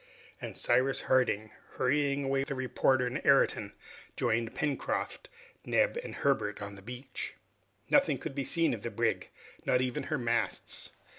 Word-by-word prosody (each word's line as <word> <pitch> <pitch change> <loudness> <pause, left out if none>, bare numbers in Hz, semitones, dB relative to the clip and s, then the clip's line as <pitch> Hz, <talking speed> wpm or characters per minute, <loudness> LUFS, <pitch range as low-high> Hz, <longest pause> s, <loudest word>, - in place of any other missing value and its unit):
And - - -6
Cyrus 135 +1 +2
Harding, 110 -5 +2 0.2
hurrying 140 +1 +1
away 135 0 +1
the 140 0 -3
reporter 130 0 +2
and 125 +2 -2
Ayrton, 125 -7 +3 0.4
joined 115 0 0
Pencroft, 145 -2 -2 0.3
Neb, - - +2
and - - -7
Herbert 110 -7 +1
on 100 0 -6
the 100 - -11
beach. 125 +5 -6 0.5
Nothing - - +4
could - - -5
be 140 0 -2
seen 165 +1 +2
of 110 - -4
the 120 - -3
brig, 105 - 0 0.3
not 125 - +3
even 125 -1 -1
her 155 - -1
masts. 120 -2 -1
130 Hz, 150 wpm, -31 LUFS, 115-140 Hz, 0.5 s, Nothing